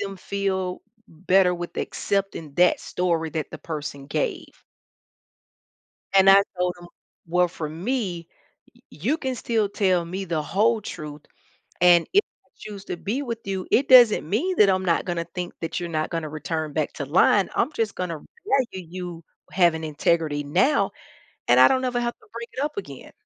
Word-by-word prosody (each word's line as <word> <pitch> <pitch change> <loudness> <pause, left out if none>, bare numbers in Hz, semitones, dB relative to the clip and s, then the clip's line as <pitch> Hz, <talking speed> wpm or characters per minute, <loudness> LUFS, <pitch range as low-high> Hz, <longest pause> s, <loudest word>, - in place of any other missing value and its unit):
them 195 -1 -4
feel 190 -1 -2 0.3
better 180 +2 +2
with 175 0 -7
accepting 195 -7 -3
that 180 0 +4
story 170 -3 -1
that 155 -1 -4
the - - -8
person 145 -3 -6
gave. - - -3 1.5
And 195 0 +7
I 200 +1 +8 0.2
told 180 0 0
him, 175 - -11 0.4
"Well, 180 +1 +2
for 160 -3 -5
me, 180 - -3 0.5
y - - -23
you 250 - -1
can 260 -3 -2
still 225 -4 0
tell 185 -4 +1
me 190 +3 -5
the 165 -4 -2
whole 220 +6 +1
truth, 150 -4 -8 0.6
and 175 -1 +6
if 405 - +6 0.2
I - - -33
choose 200 -2 -9
to 175 - -5
be 230 +11 -3
with 235 -4 -4
you, 190 -1 -3
it 270 +3 +3
doesn't 240 -10 +7
mean 355 - 0
that 205 -2 +6
I'm 185 0 +1
not 170 +2 +1
gonna 175 -2 -2
think 180 -1 -4
that 165 - -3
you're 175 - -5
not 155 -1 -2
gonna 165 -3 -3
return 155 0 -4
back 155 -2 -1
to 140 - -5
lying, 185 +5 +3
I'm 285 - +1
just 220 -3 -2
gonna 170 -4 -4 0.3
value 235 - -1
you 175 -2 -7 0.2
for - - -21
having 170 -3 +3
integrity 155 -1 0
now, 185 - +2 0.6
and - - +6
I - - +9
don't 260 -1 +1
ever 245 -1 0
have 240 0 -2
to - - -23
bring 235 0 -7
it 260 - -5
up 300 - -4
again." 405 - -8
180 Hz, 180 wpm, -24 LUFS, 165-210 Hz, 1.5 s, I